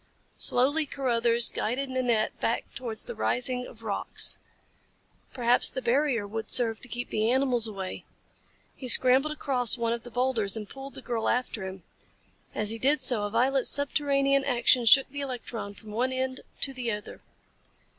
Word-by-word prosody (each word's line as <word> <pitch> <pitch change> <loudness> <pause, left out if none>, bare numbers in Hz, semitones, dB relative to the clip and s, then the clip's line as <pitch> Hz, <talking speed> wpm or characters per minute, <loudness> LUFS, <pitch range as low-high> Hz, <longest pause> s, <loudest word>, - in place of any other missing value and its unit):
Slowly 285 +5 +2
Carruthers 235 -4 0
guided 260 +4 -3
Nanette 245 -4 0
back - - -1
towards 235 -4 -5
the - - -6
ring 125 - -2
of 225 -1 -15
rocks 210 -3 +3 0.9
perhaps 245 -1 +3
the - - -5
barrier 255 -3 0
would 220 +1 -6
serve 230 -3 +3
to - - -4
keep 245 0 -6
the 215 +1 0
animals 250 -3 +2
away. 195 -3 -7 0.7
He 260 - -8
scrambled 260 +4 +6
across 255 -6 0
one 230 -1 -1
of 235 - -5
the 245 - -11
boulders 240 -4 -1
and 210 -2 -7
pulled 270 +3 -10
the - - -10
girl 230 -2 -2
after 235 -5 -2
him. 190 -1 -9 0.7
As 210 0 +1
he 225 - -4
did 285 +5 +2
so, 250 -4 +4
a - - -3
violent 255 +4 +1
subterranean 275 -1 +2
action 245 -2 +2
shook 270 +3 +7
the 285 +1 -7
electron 240 -6 -6
from 215 0 -13
one 245 +4 -1
end 260 0 -3 0.2
to 270 - 0
the 250 -2 -4
other. 210 -1 -7
245 Hz, 165 wpm, -27 LUFS, 225-265 Hz, 0.9 s, shook